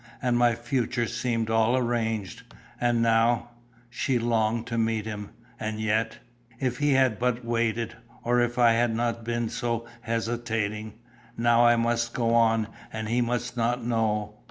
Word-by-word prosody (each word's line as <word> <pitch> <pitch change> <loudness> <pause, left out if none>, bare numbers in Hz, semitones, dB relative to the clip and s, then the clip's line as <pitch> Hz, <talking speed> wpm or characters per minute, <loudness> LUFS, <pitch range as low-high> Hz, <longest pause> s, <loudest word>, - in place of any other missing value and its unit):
"And 125 -2 +1
my 120 -1 +4
future 120 0 -1
seemed 115 -1 -1
all 115 +3 +3
arranged; 115 -5 -1 0.4
and 120 -1 +2
now 115 +1 +2 0.2
" 120 0 -31
she 130 +1 0
longed 115 -1 +1
to 115 -1 -3
meet 110 -1 0
him, 105 -2 -5 0.3
and 110 0 -3
yet 110 +1 0 0.4
"If 125 -2 -1
he 145 -1 +3
had 130 -5 +3
but 125 0 0
waited, 115 -1 -1 0.3
or 120 +1 +2
if 120 0 0
I 120 -2 +6
had 115 0 +2
not 115 0 -1
been 120 0 -1
so 120 0 -2 0.2
hesitating! 115 -2 -2 0.4
Now 120 +1 +4
I 120 - +6
must 120 0 0
go 115 -1 +1
on, 115 -2 +3 0.2
and 110 -1 -4
he 120 +2 +2
must 120 +1 -2
not 120 0 0
know. 105 -2 -1
115 Hz, 160 wpm, -26 LUFS, 115-120 Hz, 0.4 s, I